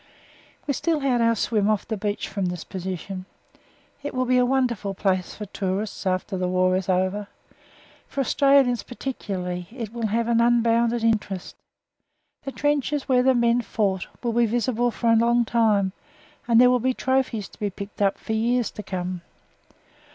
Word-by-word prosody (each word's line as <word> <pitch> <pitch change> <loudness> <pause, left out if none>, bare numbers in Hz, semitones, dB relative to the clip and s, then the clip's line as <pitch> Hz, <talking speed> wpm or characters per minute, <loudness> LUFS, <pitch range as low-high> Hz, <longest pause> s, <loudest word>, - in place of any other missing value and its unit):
We 280 - 0
still 320 +2 0
had 255 -3 +2
our 230 0 +3
swim 215 -1 +1
off 215 -2 0
the 220 - -2
beach 205 0 -3
from 195 -1 -3
this 180 -2 -3
position. 185 0 -6 0.8
It 285 -1 -5
will 255 0 +1
be 250 0 +3
a 250 - +4
wonderful 240 -7 0
place 185 -2 -1
for 210 - -6
tourists 195 +1 -3
after 185 +2 -1
the 180 0 -1
war 185 0 +2
is 185 0 -2
over. 190 +2 0 0.8
For 275 - -2
Australians 275 -2 +3
particularly 185 -9 -5
it 230 -3 -7
will 235 -2 -1
have 230 +2 0
an 235 -1 +3
unbounded 235 0 +2
interest. 210 -5 -1 0.9
The 275 - -3
trenches 290 0 0
where 255 -2 +4
the 260 0 +4
men 235 0 +3
fought 200 -4 -1 0.2
will 235 -1 0
be 235 0 +3
visible 240 +1 +1
for 230 0 0
a - - +6
long 235 +1 +3
time, 215 -4 +2 0.6
and 230 -1 +5
there 250 0 +7
will 250 - +3
be 255 +2 0
trophies 260 -5 0
to - - -19
be 205 - -1
picked 200 +1 -8
up 200 -1 +2
for 220 - -5
years 235 +2 +1
to - - -7
come. 185 -2 -4
225 Hz, 175 wpm, -24 LUFS, 195-245 Hz, 0.9 s, there